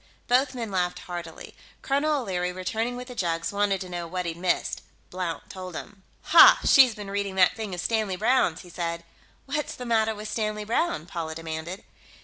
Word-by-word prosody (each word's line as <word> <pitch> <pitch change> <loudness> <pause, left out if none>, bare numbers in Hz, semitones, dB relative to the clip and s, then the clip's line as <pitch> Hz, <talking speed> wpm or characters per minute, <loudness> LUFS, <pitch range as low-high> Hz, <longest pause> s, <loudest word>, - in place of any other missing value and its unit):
Both 255 +2 +2
men 230 -4 -4
laughed 180 -1 0
heartily. 175 -3 -8 0.3
Colonel 285 +1 +1
O'Leary, 180 -4 -2
returning 220 +7 -2
with 250 0 -7
the 250 - -8
jugs, 165 -6 -1
wanted 200 -1 +1
to 185 - -5
know 175 -1 -4
what 180 +1 -3
he'd 165 -1 -3
missed. 175 +1 -1 0.3
Blount 180 -3 -4
told 185 -2 -8
him. 200 +2 -8 0.2
"Ha! - - +8
She's 255 -5 +7
been 205 -2 -7
reading 200 -1 -2
that 185 -1 +4
thing 215 -4 -5
of 175 - -4
Stanley 215 -4 0
Browne's," 215 -5 +2
he 180 - -14
said. 170 -1 -3 0.4
"What's 290 +2 -3
the 250 - -7
matter 220 -2 +2
with 210 +1 -7
Stanley 215 0 -2
Browne?" 225 - 0
Paula 165 -2 -5
demanded. 165 +3 -6
195 Hz, 185 wpm, -26 LUFS, 175-225 Hz, 0.4 s, Ha